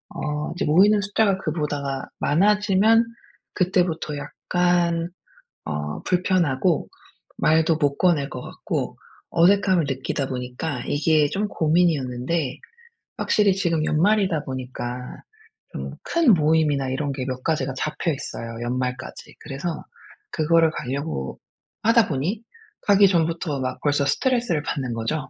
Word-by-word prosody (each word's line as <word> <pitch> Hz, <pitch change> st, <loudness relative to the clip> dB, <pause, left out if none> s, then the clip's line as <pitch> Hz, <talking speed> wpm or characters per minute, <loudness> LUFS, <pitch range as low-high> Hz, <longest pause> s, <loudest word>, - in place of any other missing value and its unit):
어 150 Hz, 0 st, -3 dB
이제 -, -, -1 dB
모이는 200 Hz, +7 st, +5 dB
숫자가 205 Hz, -1 st, +1 dB
그보다 145 Hz, -5 st, -3 dB
많아지면 210 Hz, +6 st, +3 dB, 0.5 s
그때부터 175 Hz, -5 st, 0 dB
약간 175 Hz, +2 st, 0 dB, 0.6 s
어 75 Hz, -1 st, -4 dB
불편하고 175 Hz, -4 st, +1 dB, 0.5 s
말도 160 Hz, +1 st, +3 dB
못 145 Hz, -2 st, 0 dB
꺼낼 160 Hz, -7 st, +2 dB
것 130 Hz, -, -7 dB
같고 -, -, -4 dB, 0.3 s
어색함을 185 Hz, 0 st, +4 dB
느끼다 135 Hz, +1 st, -2 dB
보니까 125 Hz, +2 st, -4 dB
이게 150 Hz, 0 st, +2 dB
좀 205 Hz, +7 st, -2 dB
고민이었는데 155 Hz, -4 st, 0 dB, 0.6 s
확실히 205 Hz, -2 st, +3 dB
지금 165 Hz, -4 st, 0 dB
연말이다 185 Hz, -1 st, +2 dB
보니까 125 Hz, -2 st, -5 dB, 0.8 s
좀 -, -, -5 dB
큰 330 Hz, -9 st, +4 dB
모임이나 150 Hz, -4 st, +2 dB
이런 140 Hz, +2 st, -2 dB
게 135 Hz, -1 st, -4 dB
몇 130 Hz, -1 st, -4 dB
가지가 140 Hz, -4 st, 0 dB
잡혀 155 Hz, +4 st, -1 dB
있어요 115 Hz, -4 st, -6 dB
연말까지. 125 Hz, +1 st, -4 dB
그래서 150 Hz, +4 st, -5 dB, 0.5 s
그거를 165 Hz, 0 st, +3 dB
가려고 135 Hz, -, -4 dB, 0.4 s
하다 230 Hz, -1 st, +5 dB
보니 165 Hz, -, -2 dB, 0.4 s
가기 200 Hz, -1 st, +5 dB
전부터 165 Hz, -4 st, 0 dB
막 130 Hz, 0 st, -3 dB
벌써 145 Hz, -1 st, +1 dB
스트레스를 235 Hz, -, +1 dB
받는 130 Hz, -5 st, -3 dB
거죠. 115 Hz, +6 st, -3 dB
155 Hz, 280 characters per minute, -23 LUFS, 135-180 Hz, 0.8 s, 모이는